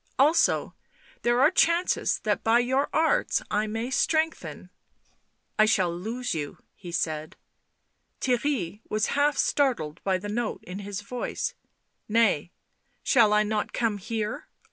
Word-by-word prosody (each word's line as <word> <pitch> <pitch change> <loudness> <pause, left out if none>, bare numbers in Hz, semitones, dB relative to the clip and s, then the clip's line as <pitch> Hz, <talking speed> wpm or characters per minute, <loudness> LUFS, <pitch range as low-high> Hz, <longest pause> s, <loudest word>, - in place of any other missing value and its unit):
"Also 300 +5 +3 0.5
there 240 +1 +2
are 295 +4 +6
chances 345 -1 +2
that - - 0
by 225 +1 +4
your 260 +3 +1
arts 320 0 +2
I 210 +1 +1
may 225 +4 -3
strengthen 320 +3 -1 0.3
" - - -41
" - - -29
I 215 - +7
shall 185 -5 +2
lose 230 +7 -3
you," 150 -3 -4 0.2
he 175 -3 -10
said. 155 -2 -2 0.8
Theirry 245 - -1
was 215 0 0
half 290 0 +2
startled 240 - 0
by 190 -1 +1
the 195 +3 -7
note 220 +2 -3
in 180 +2 -7
his 200 0 -5
voice. 245 +4 -4 0.3
" - - -49
Nay... 180 -7 +2 0.5
shall 230 -5 +4
I 210 0 +4
not 210 0 -2
come 220 -4 0
here... 220 +7 -4
220 Hz, 145 wpm, -26 LUFS, 200-260 Hz, 0.8 s, I